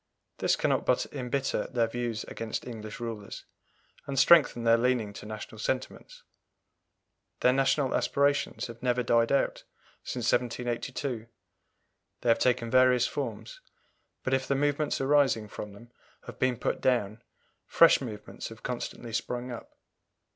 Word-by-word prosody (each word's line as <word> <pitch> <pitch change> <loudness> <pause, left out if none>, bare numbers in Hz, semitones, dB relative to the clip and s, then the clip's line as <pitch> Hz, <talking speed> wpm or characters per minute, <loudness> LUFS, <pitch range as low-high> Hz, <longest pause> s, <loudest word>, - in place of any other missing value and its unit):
This - - +2
cannot - - +1
but - - +2
embitter 135 0 -2
their 120 -2 +1
views 115 -1 -3
against 115 -1 -5
English 110 -3 -7
rulers, 115 -4 -6 0.6
and 140 -1 -4
strengthen 140 -6 +6
their 115 0 +5
leaning 115 -3 +1
to 105 - -9
national 110 0 -8
sentiments. 130 - -4 1.2
Their 125 - +5
national 135 0 +2
aspirations 140 -2 +1
have 115 -1 -10
never 125 0 +1
died 115 -1 +3
out 140 - +1 0.4
since 125 -3 -4
1782. 120 0 -2 0.9
They 120 - 0
have 115 - +4
taken 120 -2 +1
various 130 -1 +5
forms; - - -5 0.6
but 130 - -1
if 130 0 +1
the 140 - +1
movements 145 +1 0
arising 135 -5 +3
from 105 0 -8
them 120 +4 -15 0.3
have - - -10
been 130 -1 +1
put - - -2
down, 115 -3 +1 0.5
fresh - - +6
movements 110 -5 -7
have 115 -1 -13
constantly 120 -1 -5
sprung 125 +2 -3
up. 120 - -9
125 Hz, 140 wpm, -29 LUFS, 115-130 Hz, 1.2 s, strengthen